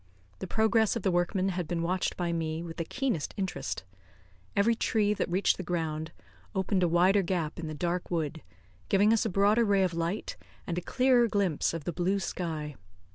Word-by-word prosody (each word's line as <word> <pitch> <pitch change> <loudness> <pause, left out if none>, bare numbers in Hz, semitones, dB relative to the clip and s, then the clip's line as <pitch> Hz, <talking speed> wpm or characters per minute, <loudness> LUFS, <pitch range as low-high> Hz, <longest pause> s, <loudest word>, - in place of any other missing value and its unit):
The - - -5
progress 220 0 +2
of 230 - -3
the 190 - +2
workmen 180 +2 +1
had 180 -3 -3
been 170 0 -2
watched 180 +2 -1
by 175 -1 -1
me 160 0 -2
with 165 -1 -8
the 165 - -1
keenest 240 - -2
interest. 190 - -3 0.7
Every 205 +4 +4
tree 215 -2 +1
that 210 - -2
reached 185 +3 +2
the - - -4
ground 160 -2 -2 0.4
opened 190 0 +1
a 175 - +4
wider 180 +4 +4
gap 170 -4 -2
in 165 - -4
the 155 - -5
dark 175 +3 -2
wood, 160 -2 -2 0.5
giving 205 +3 +4
us 225 - +2
a - - +1
broader 205 +4 +3
ray 200 -3 +3
of 180 -2 0
light 170 +5 -3 0.3
and 170 - -3
a - - -8
clearer 250 +3 +3
glimpse 200 -8 +1
of 165 -2 -5
the 175 - -3
blue 180 +4 +1
sky. 160 -4 -4
180 Hz, 195 wpm, -29 LUFS, 165-205 Hz, 0.7 s, Every